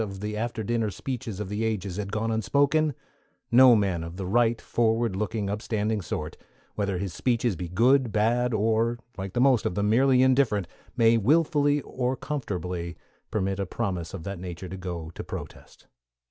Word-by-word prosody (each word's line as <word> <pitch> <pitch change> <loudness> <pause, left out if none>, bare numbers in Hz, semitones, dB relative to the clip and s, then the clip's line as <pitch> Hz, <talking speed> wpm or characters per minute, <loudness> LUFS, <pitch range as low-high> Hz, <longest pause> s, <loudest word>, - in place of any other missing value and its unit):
of 100 -3 -5
the 105 +1 -4
after 115 +1 -3
dinner 115 0 0
speeches 115 +1 -5
of 105 - -3
the 105 +3 -2
ages 100 -4 -2
had 100 -1 -4
gone 110 +2 -1
unspoken, 140 +6 +2 0.6
no 125 0 +8
man 95 -6 0
of 85 +2 -8
the 95 - -4
right, 115 +4 +2
forward 115 -2 +1
looking, 105 +1 -2
upstanding 105 +1 -1
sort, 75 -4 -4 0.4
whether 100 -3 -1
his 95 -1 -4
speeches 120 0 0
be 85 +1 -5
good, 120 +6 +3
bad, 120 +3 +2
or, 115 +2 +1 0.2
like 95 0 -6
the - - 0
most 130 -2 +4
of 90 - -2
them, 105 +1 +1
merely 130 +2 +4
indifferent, 125 -8 +2 0.3
may 115 -1 +5
wilfully 145 - +3
or 130 0 -2
comfortably 90 - -4 0.3
permit 95 -2 -1
a 100 - 0
promise 90 -3 -3
of 95 -5 -7
that 100 0 -5
nature 90 0 -7
to 95 - -6
go 85 -4 -6
to - - -7
protest. - - -9
110 Hz, 175 wpm, -26 LUFS, 95-120 Hz, 0.6 s, no